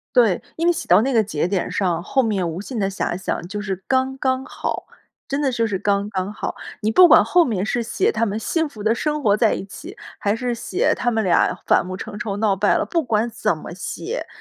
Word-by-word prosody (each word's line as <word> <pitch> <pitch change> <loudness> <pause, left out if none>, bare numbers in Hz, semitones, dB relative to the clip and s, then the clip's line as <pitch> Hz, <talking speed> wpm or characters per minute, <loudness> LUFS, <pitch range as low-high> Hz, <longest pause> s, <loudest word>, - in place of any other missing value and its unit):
对， 230 -7 +4 0.2
因 335 +1 +1
为 - - +6
写 340 - -6
到 180 +4 +6
那 270 +4 0
个 225 -3 +4
节 170 -4 -1
点 190 -2 -1
上， 175 -4 0
后 265 +7 +1
面 200 -7 0
无 165 +4 -4
限 245 +3 -6
的 195 -2 +1
遐 190 -2 -2
想 190 - -3
就 210 +2 -5
是 195 -2 -4
刚 265 0 +1
刚 260 0 0
好， - - -4 0.4
真 280 +2 -1
的 270 - +1
就 230 -2 0
是 200 -4 -2
刚 200 0 +1
刚 190 +1 -2
好。 - - -5 0.3
你 215 +1 +1
不 360 +8 +8
管 - - +7
后 355 -1 +4
面 205 - -1
是 240 +2 -1
写 380 - 0
他 230 - -1
们 210 -1 -1
幸 320 +7 -1
福 210 -5 -10
地 220 +1 +3
生 300 +3 -2
活 205 -1 +4
在 220 0 +3
一 - - -5
起， 320 - -10 0.2
还 205 +1 +1
是 245 +1 -2
写 365 - 0
他 245 - 0
们 225 -2 0
俩 180 -2 +2
反 - - +4
目 185 +1 -6
成 205 +2 -7
仇 200 -3 -3
闹 205 -2 +2
掰 205 +2 +2
了。 - - 0
不 335 +9 0
管 230 -4 0
怎 230 - -1
么 - - -9
写， - - -5
220 Hz, 265 characters per minute, -21 LUFS, 200-260 Hz, 0.4 s, 不